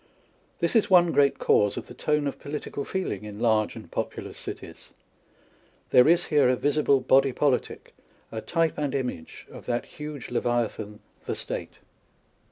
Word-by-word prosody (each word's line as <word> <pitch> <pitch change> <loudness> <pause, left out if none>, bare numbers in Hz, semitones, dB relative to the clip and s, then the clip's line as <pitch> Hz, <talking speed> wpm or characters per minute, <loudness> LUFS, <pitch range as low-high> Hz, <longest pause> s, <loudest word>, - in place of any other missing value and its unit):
This 170 +4 -1
is 225 - +4
one 175 -3 +6
great 140 -2 +3
cause 105 -1 +2
of - - -5
the - - -11
tone 150 -1 0
of 140 - -3
political 145 -1 -5
feeling 160 - -3
in 105 -1 -8
large 110 -2 +2
and - - -11
populous - - -4
cities. - - -8 1.0
There 125 - +7
is 170 +2 +4
here 145 -5 +3
a 130 - +3
visible 140 0 +2
body 135 +1 +4
politic, 140 -2 -1 0.4
a 110 - -4
type 165 +9 0
and 145 -2 -1
image 125 -12 -4
of - - -12
that 120 0 -1
huge 150 -3 -8
Levia 120 -1 0
than 105 -1 -8 0.3
the - - -1
State. - - -5
140 Hz, 165 wpm, -26 LUFS, 120-150 Hz, 1.0 s, There